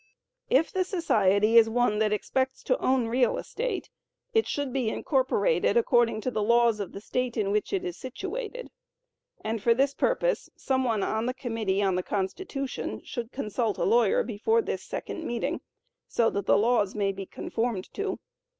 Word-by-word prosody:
If 295 +5 +3
the 375 - +1
society 220 - +4
is 225 -1 +4
one 225 -2 +1
that 215 -1 +2
expects 260 +5 -1
to 255 - +1
own 255 -2 +2
real 245 +2 +2
estate, 470 -5 -4 0.4
it 445 0 +3
should 285 -3 -2
be 255 -5 0
incorporated 275 - +1
according 240 - +3
to 255 - -2
the 215 - -1
laws 235 0 +3
of 200 -3 -4
the - - -7
state 250 +3 -2
in 200 -2 0
which 210 0 0
it 385 -2 -1
is 355 -2 -4
situated, 420 - -6 0.7
and 220 0 -3
for 230 +2 +4
this 275 +2 +2
purpose, - - 0
some 260 -1 0
one 225 -5 0
on 220 +2 -1
the 255 - -2
committee 220 -6 -1
on 190 -1 +2
the 180 - 0
Constitution 265 - -3
should 240 -1 -5
consult 220 -3 -2
a - - -1
lawyer 230 -1 +3
before 245 - +1
this - - -3
second 330 - -5
meeting, 240 -6 -2 0.5
so 230 -1 +2
that 200 - -3
the - - +5
laws 210 -2 +2
may 200 -2 +1
be 195 -1 -7
conformed 225 -5 -3
to. 395 -1 -2
240 Hz, 175 wpm, -27 LUFS, 215-275 Hz, 0.7 s, the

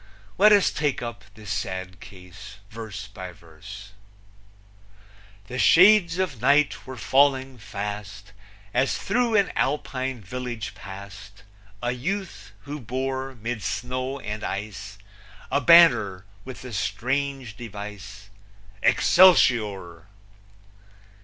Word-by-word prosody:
Let 210 +2 +7
us 205 -2 +5
take 145 -4 -1
up 120 -2 -7
this 105 -3 -9
sad 95 -2 -4
case 95 +2 -12 0.2
verse 110 -3 -7
by 95 -3 -9
verse: 85 +5 -12 1.5
The 125 +5 -6
shades 180 0 +6
of 170 -12 -2
night 140 +2 +2
were 130 -1 -7
falling 130 +2 +2
fast, 105 -1 -7 0.4
As 130 +2 +1
through 235 +2 0
an 200 -2 +3
Alpine 130 -2 -2
village 120 +1 -6
passed 100 +1 -11 0.4
A 120 - 0
youth, 190 +10 -5
who 145 +1 -7
bore, 130 +2 -4
'mid 115 0 -5
snow 125 +7 -3
and 105 -2 -6
ice, 100 0 -6 0.5
A 140 - +2
banner 125 - +5 0.2
with 130 -1 -9
the 125 -2 -8
strange 125 +5 -2
device, 105 -2 -9 0.5
Excelsior! 105 - +4
115 Hz, 105 wpm, -24 LUFS, 100-135 Hz, 1.5 s, Let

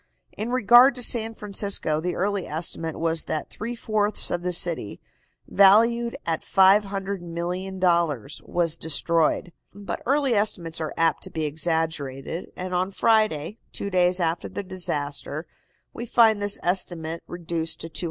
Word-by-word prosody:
In 215 +3 -4
regard 245 +2 +6
to 250 - -1
San 225 -1 0
Francisco, 200 -7 -1
the 180 +2 -3
early 200 +1 -1
estimate 160 0 -2
was 165 -1 0
that 155 - -4
three 235 +3 -5
fourths 215 -2 +1
of 175 - -1
the 180 0 -2
city, 170 -11 +1 0.5
valued 230 +4 +4
at 165 -1 -1
$500,000,000, 185 - 0
was 170 -2 +1
destroyed. 165 +2 +1 0.2
But 205 0 -6
early 275 -1 +2
estimates 175 -6 -1
are 155 - -4
apt 165 0 +2
to - - -7
be 160 -1 -3
exaggerated, 160 -1 -3
and 185 0 -5
on 180 +1 0
Friday, 215 -3 +1
two 200 - -5
days 180 0 +2
after 165 -1 -1
the 205 - -5
disaster, 155 -4 -3 0.5
we 235 - -7
find 220 -3 +4
this 205 0 0
estimate 170 -2 -1
reduced 165 -2 -4
to 165 - -5
$250,000,000. 160 - -2
180 Hz, 140 wpm, -24 LUFS, 165-205 Hz, 0.5 s, regard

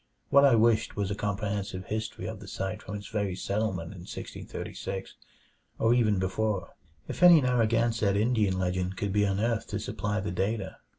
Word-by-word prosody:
What 140 0 +7
I 135 -4 +6
wished 115 0 +3
was 100 -1 -1
a - - +1
comprehensive 100 -2 -3
history 110 +1 -4
of - - -5
the - - -11
site 95 +3 -4
from 105 - -6
its 100 0 -7
very 100 -4 -1
settlement 100 -4 -2
in 95 - -10
1636 95 0 -6 0.6
or 115 +1 +3
even 110 -4 +3
before, 95 +1 -1 0.3
if - - -6
any 175 -2 +9
Narragansett 115 -4 +2
Indian 105 -4 +2
legend 90 0 -1
could 100 +1 -2
be 105 0 +3
unearthed 105 +3 0
to - - -2
supply 105 +1 -2
the 100 -2 -3
data. 100 +5 -2
105 Hz, 170 wpm, -28 LUFS, 95-115 Hz, 0.6 s, any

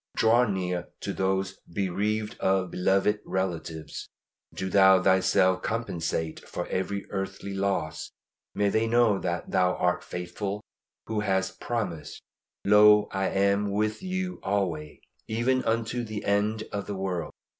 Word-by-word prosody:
Draw 115 +2 +4
near 90 -3 -2
to - - -3
those 95 0 -1
bereaved 105 +4 -1
of 95 -2 +1
beloved 95 +3 +2
relatives. 85 -4 -4 0.4
Do 95 - -4
Thou 95 0 +6
Thyself 95 0 +3
compensate 85 -8 -2
for - - -5
every 100 +2 -2
earthly 95 0 -4
loss. 95 -5 -1 0.5
May 100 0 +2
they 110 +2 +1
know 115 -4 +3
that 85 -1 -3
Thou 90 0 +3
art 90 0 0
faithful 95 +4 -4 0.4
who 110 -1 -2
hast 95 -2 0
promised, 100 -10 -3 0.5
"Lo, 105 +1 +7
I 95 0 0
am 100 +1 +2
with 105 +2 -1
you 185 -1 -3
alway, 90 -7 -2 0.3
even 125 +4 +1
unto 115 +2 0
the 110 -2 -5
end 105 +2 +1
of 100 -1 -4
the 100 - -3
world." 95 -3 -3
100 Hz, 135 wpm, -27 LUFS, 95-105 Hz, 0.5 s, Lo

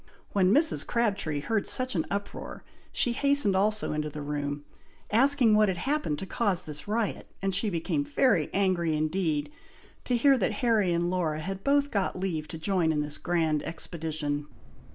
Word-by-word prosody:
When 190 -2 +3
Mrs. 310 +7 +3
Crabtree 200 -11 0
heard 215 +5 -1
such 255 0 +1
an 165 -5 -1
uproar, 200 0 -5 0.3
she 245 - +2
hastened 280 -6 +3
also 210 -1 +1
into 150 0 -2
the 150 0 -7
room, 145 0 -3 0.5
asking 250 0 +4
what 210 0 +5
had 185 - -2
happened 270 - -1
to 195 - -5
cause 190 -3 -1
this 150 +1 -6
riot, 220 0 -2
and 195 0 -1
she 200 +3 +2
became 180 - -1
very 285 -3 +2
angry 175 -5 +1
indeed, 155 -2 -1 0.5
to 245 - +1
hear 270 +1 +4
that - - 0
Harry 215 -6 +3
and 170 +1 0
Laura 165 -4 -1
had 195 +3 -5
both 285 0 +2
got 195 -2 -1
leave 165 -5 -2
to 160 - -7
join 170 -1 +1
in 150 -1 0
this 150 0 -4
grand 160 -4 0
expedition. 155 -3 -4
190 Hz, 175 wpm, -28 LUFS, 155-220 Hz, 0.5 s, what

